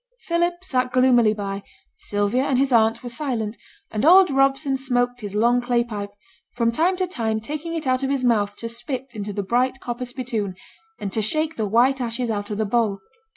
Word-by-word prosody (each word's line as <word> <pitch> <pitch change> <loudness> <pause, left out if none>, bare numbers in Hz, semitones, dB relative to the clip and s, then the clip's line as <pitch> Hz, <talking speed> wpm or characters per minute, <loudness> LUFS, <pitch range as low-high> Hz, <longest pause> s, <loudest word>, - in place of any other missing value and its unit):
Philip 345 +1 -1
sat 255 -8 0
gloomily 250 -3 +4
by; 200 -1 -4 0.3
Sylvia 205 +4 0
and 270 - +1
his 270 0 +2
aunt 225 +1 +3
were 245 - -5
silent, 235 -4 -3 0.4
and 215 - -2
old 365 +3 +7
Robson 270 +1 +2
smoked 245 -2 0
his 205 -1 -6
long 240 +3 +3
clay 240 -1 +1
pipe, 205 -4 -5 0.5
from 235 -1 +2
time 345 +9 +1
to 370 - +1
time 225 -11 -2
taking 305 +8 -5
it 320 - -4
out 255 0 +1
of 270 - -1
his 275 -2 0
mouth 210 -4 +2
to 230 - -6
spit 250 +3 -5
into 210 -2 -5
the 200 0 -3
bright 255 +5 +1
copper 245 0 -4
spittoon, 240 -6 -4 0.4
and 195 - -4
to 220 - 0
shake 310 +9 0
the 220 -2 -1
white 250 +6 +3
ashes 235 0 -2
out 205 -1 -3
of 210 - -3
the 220 - 0
bowl. 215 -2 +1
245 Hz, 200 wpm, -23 LUFS, 220-270 Hz, 0.5 s, old